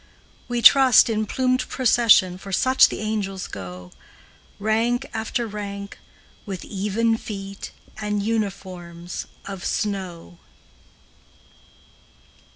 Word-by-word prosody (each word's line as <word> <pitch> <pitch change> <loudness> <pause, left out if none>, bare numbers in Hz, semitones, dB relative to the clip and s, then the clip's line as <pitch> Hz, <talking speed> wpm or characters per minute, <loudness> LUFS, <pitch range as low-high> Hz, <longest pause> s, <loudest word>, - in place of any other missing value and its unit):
We 240 -1 -2
trust, 260 -4 +7
in 215 -1 -1
plumed 255 +1 0
procession, 220 -7 +4
For 195 - -9
such 260 +7 +5
the - - -5
angels 200 -3 -3
go, 90 -2 -9 0.7
Rank 230 +5 0
after 225 +2 -2
rank, 200 -2 -7 0.4
with 195 -4 -6
even 215 +3 0
feet 195 -2 -7 0.3
And 210 -1 -2
uniforms 185 -5 -4 0.2
of 195 -2 -7
snow. 180 - -4
205 Hz, 95 wpm, -23 LUFS, 190-230 Hz, 0.7 s, trust